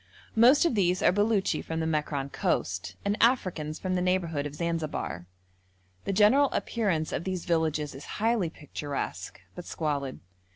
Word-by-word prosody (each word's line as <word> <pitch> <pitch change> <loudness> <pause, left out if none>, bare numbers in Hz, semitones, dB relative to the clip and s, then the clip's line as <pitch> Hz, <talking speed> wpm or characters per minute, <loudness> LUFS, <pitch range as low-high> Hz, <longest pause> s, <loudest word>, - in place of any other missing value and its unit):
Most 250 +8 +6
of 335 - +2
these 180 -4 +1
are - - +6
Beluchi 205 0 +1
from 160 0 -4
the 160 - -1
Mekran 150 -3 -1
coast, 90 0 -1
and 200 +1 +1
Africans 180 - +1
from 185 -1 -3
the 180 - +1
neighbourhood 170 -5 0
of 145 - -10
Zanzibar. 155 - -3 0.8
The - - 0
general 220 +8 +5
appearance 190 -9 -1
of - - -2
these 185 -2 -3
villages 160 -4 0
is 135 +2 -9
highly 220 -5 +1
picturesque, 145 -2 -5
but 180 - -9
squalid. 140 -4 -3
170 Hz, 155 wpm, -28 LUFS, 150-200 Hz, 0.8 s, Most